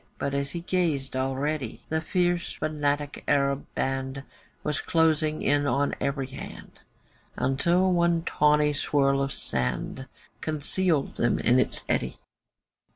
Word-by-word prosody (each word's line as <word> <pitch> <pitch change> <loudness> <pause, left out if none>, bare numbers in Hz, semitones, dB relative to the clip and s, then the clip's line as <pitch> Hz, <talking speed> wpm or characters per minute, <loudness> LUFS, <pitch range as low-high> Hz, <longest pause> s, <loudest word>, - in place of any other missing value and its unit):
But 140 - -2
as 140 0 -1
he 170 +3 -5
gazed, 165 -8 0
already 135 0 -2
The 160 0 0
fierce 175 +1 0
fanatic 145 -1 -2
Arab 140 0 +1
band 135 0 -2 0.4
Was 150 - -1
closing 155 -2 +2
in 145 0 +2
on 140 +1 +1
every 140 -1 -1
hand, 130 +1 -10 0.6
Until 170 +8 +2
one 170 -1 +2
tawny 150 -2 +3
swirl 140 -1 +2
of 135 0 -1
sand, 65 - -3 0.3
Concealed 155 0 0
them 120 - +2
in 125 +3 +3
its - - +1
eddy. 65 - -1
145 Hz, 125 wpm, -27 LUFS, 135-160 Hz, 0.6 s, tawny